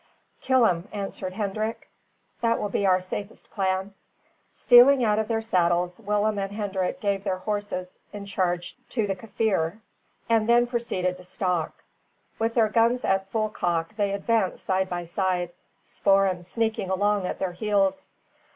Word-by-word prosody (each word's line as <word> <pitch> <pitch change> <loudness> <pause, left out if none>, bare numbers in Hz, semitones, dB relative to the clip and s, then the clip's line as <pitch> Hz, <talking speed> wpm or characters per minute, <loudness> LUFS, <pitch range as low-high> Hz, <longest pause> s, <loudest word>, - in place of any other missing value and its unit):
"Kill 260 -2 +4
him," 180 -2 0
answered 195 -2 -5
Hendrik; 215 +2 -3 0.5
"that 230 0 +2
will 205 - -2
be 200 0 0
our 185 -1 +4
safest 195 +3 -7
plan." 190 0 -1 0.6
Stealing 250 +2 +6
out 210 -1 +2
of 220 - -1
their 225 0 -1
saddles, 175 -3 +1
Willem 210 0 0
and 195 0 -3
Hendrik 200 +2 -2
gave 200 -3 -1
their 190 -2 -1
horses 205 -2 -4
in 205 -1 -7
charge 180 -3 -2
to 225 -4 0
the 195 -1 -2
Kaffir, 200 -3 -1 0.5
and 225 -1 +2
then 240 0 +5
proceeded 210 -7 -2
to 180 - -13
stalk. 180 -2 -2 0.6
With 225 +1 0
their 225 -3 +4
guns 235 +3 +2
at 195 0 +1
full 215 0 0
cock 170 -1 -2
they 205 -2 0
advanced 200 -1 0
side 190 0 0
by 175 -1 -3
side, 180 0 -1 0.3
Spoor'em 195 -2 +2
sneaking 220 +2 -2
along 200 0 +1
at - - -4
their 190 - -2
heels. 200 +6 0
200 Hz, 155 wpm, -25 LUFS, 185-220 Hz, 0.6 s, Stealing